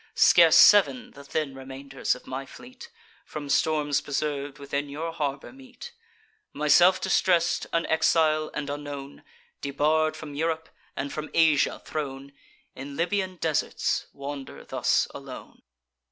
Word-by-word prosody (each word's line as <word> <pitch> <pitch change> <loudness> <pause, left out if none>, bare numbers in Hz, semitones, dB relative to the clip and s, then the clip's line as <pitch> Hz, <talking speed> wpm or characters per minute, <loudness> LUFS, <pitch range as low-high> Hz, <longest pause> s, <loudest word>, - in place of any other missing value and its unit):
Scarce 165 -3 +6
sev'n, 245 +5 +6
the 140 - -13
thin 140 0 -3
remainders 135 0 -4
of 125 - -14
my 130 +1 -5
fleet, 250 - -13 0.3
From 145 -2 -7
storms 150 -2 +1
preserv'd, 145 -1 -3
within 140 0 -4
your 160 +4 -5
harbour 140 - -4
meet. 270 - -12 0.6
Myself 175 +6 +5
distress'd, 175 -2 +1
an 165 0 0
exile, 155 -1 +2
and 150 -1 -3
unknown, 145 -1 -7 0.4
Debarr'd 155 +3 +1
from 150 -2 -9
Europe, 160 +2 -2 0.3
and 140 - -4
from 155 0 -5
Asia 160 -3 +3
thrown, 140 -2 -5 0.4
In 140 +1 -8
Libyan 185 +1 -1
deserts 160 -3 -1
wander 140 -1 -8
thus - - +1
alone." - - -10
150 Hz, 125 wpm, -26 LUFS, 140-165 Hz, 0.6 s, Scarce